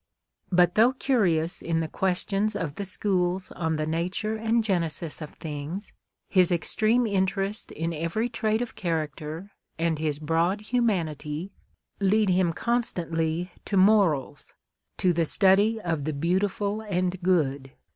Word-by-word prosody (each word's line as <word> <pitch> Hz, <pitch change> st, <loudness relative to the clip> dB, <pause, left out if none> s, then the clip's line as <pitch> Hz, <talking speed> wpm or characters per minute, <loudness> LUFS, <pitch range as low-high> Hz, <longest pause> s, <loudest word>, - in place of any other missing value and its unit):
But 175 Hz, -1 st, +4 dB
though 230 Hz, +6 st, +5 dB
curious 180 Hz, -, +1 dB
in 165 Hz, -1 st, -1 dB
the 160 Hz, -, -1 dB
questions 195 Hz, +4 st, 0 dB
of 165 Hz, -8 st, -3 dB
the 200 Hz, -, -5 dB
schools 185 Hz, -1 st, 0 dB
on 160 Hz, -2 st, -2 dB
the 155 Hz, 0 st, -1 dB
nature 180 Hz, +7 st, -2 dB
and 225 Hz, +1 st, +1 dB
genesis 170 Hz, -5 st, -2 dB
of 150 Hz, -, -6 dB
things, 155 Hz, +6 st, -6 dB, 0.3 s
his 185 Hz, -3 st, +3 dB
extreme 220 Hz, +7 st, +2 dB
interest 195 Hz, 0 st, -1 dB
in 165 Hz, +2 st, -3 dB
every 170 Hz, +9 st, -1 dB
trait 220 Hz, -1 st, 0 dB
of 240 Hz, -, -8 dB
character, 160 Hz, +1 st, -4 dB, 0.3 s
and 165 Hz, -2 st, 0 dB
his 155 Hz, -2 st, -1 dB
broad 165 Hz, +6 st, 0 dB
humanity, 180 Hz, -, -1 dB, 0.5 s
lead 205 Hz, +1 st, +3 dB
him 180 Hz, -1 st, +3 dB
constantly 170 Hz, -6 st, -1 dB
to 200 Hz, -, -1 dB
MoralS; 190 Hz, -8 st, +2 dB, 0.4 s
to 180 Hz, -1 st, +2 dB
the 170 Hz, 0 st, +1 dB
study 200 Hz, +6 st, +4 dB
of 165 Hz, -8 st, -2 dB
the 155 Hz, -, -1 dB
Beautiful 195 Hz, +7 st, 0 dB
and 185 Hz, -3 st, -2 dB
Good. 140 Hz, -7 st, 0 dB
180 Hz, 135 wpm, -26 LUFS, 165-205 Hz, 0.5 s, though